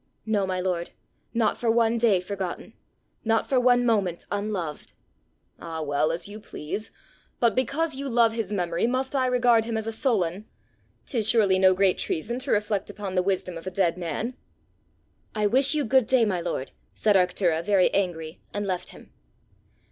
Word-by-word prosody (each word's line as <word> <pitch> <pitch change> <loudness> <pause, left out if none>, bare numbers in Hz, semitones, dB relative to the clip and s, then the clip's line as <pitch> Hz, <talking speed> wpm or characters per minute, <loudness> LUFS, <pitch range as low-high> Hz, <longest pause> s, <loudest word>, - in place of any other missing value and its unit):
"No, 210 -3 0
my 185 -1 -2
lord; 180 -2 -2 0.4
not 225 -2 +1
for 235 - 0
one 230 0 +3
day 220 -5 +4
forgotten! 185 -1 -5 0.5
not 225 0 +1
for 265 - +2
one 245 0 +4
moment 200 -7 0
unloved!" 200 -7 -4 0.7
"Ah, 160 -1 -5
well, 145 +1 +1
as 165 +3 -4
you 210 +1 -8
please! 205 +2 -6 0.5
but 235 -1 +3
because 280 +4 0
you 275 +1 -4
love 230 -2 +3
his 225 -3 -3
memory 175 -1 0
must 260 +3 -2
I 260 -1 +2
regard 245 -3 +3
him 230 -1 -2
as 220 - -3
a 225 - -2
Solon? 210 -5 -1 0.6
'Tis 225 -6 0
surely 200 -5 +4
no 185 0 +5
great 190 -1 +2
treason 235 +10 -2
to 260 - -4
reflect 205 -1 0
upon 200 -1 -6
the 185 - +2
wisdom 180 -2 -2
of 165 - -12
a - - 0
dead 180 -3 +1
man!" 180 - -3 1.0
"I 210 -1 +1
wish 265 +7 +4
you 295 - 0
good 255 +1 +3
day, 255 -3 +4
my 185 -4 -1
lord!" 165 -6 -4 0.2
said 210 -2 +2
Arctura, 180 -3 +2
very 195 0 +3
angry, 170 -4 -2
and 205 0 -2
left 185 -2 -3
him. - - -15
205 Hz, 180 wpm, -25 LUFS, 180-235 Hz, 1.0 s, no